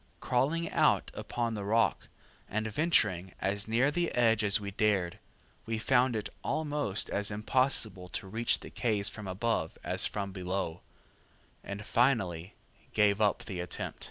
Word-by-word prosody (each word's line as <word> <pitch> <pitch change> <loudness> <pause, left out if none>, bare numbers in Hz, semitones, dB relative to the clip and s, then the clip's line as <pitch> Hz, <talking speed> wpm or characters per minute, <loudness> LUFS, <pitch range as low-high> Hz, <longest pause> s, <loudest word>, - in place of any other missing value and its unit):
Crawling 150 +7 +1
out - - +3
upon 115 -1 -2
the 105 -2 -4
rock, 110 +3 +1 0.4
and 110 +2 -1
venturing 105 - +1
as 100 +1 -1
near 120 +6 +3
the 170 +2 0
edge 115 -3 +3
as 100 -1 +2
we 100 -1 -5
dared, 100 -4 +1 0.5
we 115 0 -1
found 125 +1 +3
it 105 - -2 0.2
almost 145 - 0
as 100 0 +2
impossible 105 -4 0
to - - -5
reach 115 +4 0
the - - -10
caves 105 -4 +1
from 105 -3 -8
above 95 -3 -1
as - - +2
from 100 -2 -4
below, 90 -2 -3 0.8
and 100 +1 -6
finally 105 -8 +1 0.4
gave 105 -1 +3
up 105 -1 +2
the 95 -3 -5
attempt. 90 0 -4
105 Hz, 150 wpm, -31 LUFS, 100-120 Hz, 0.8 s, out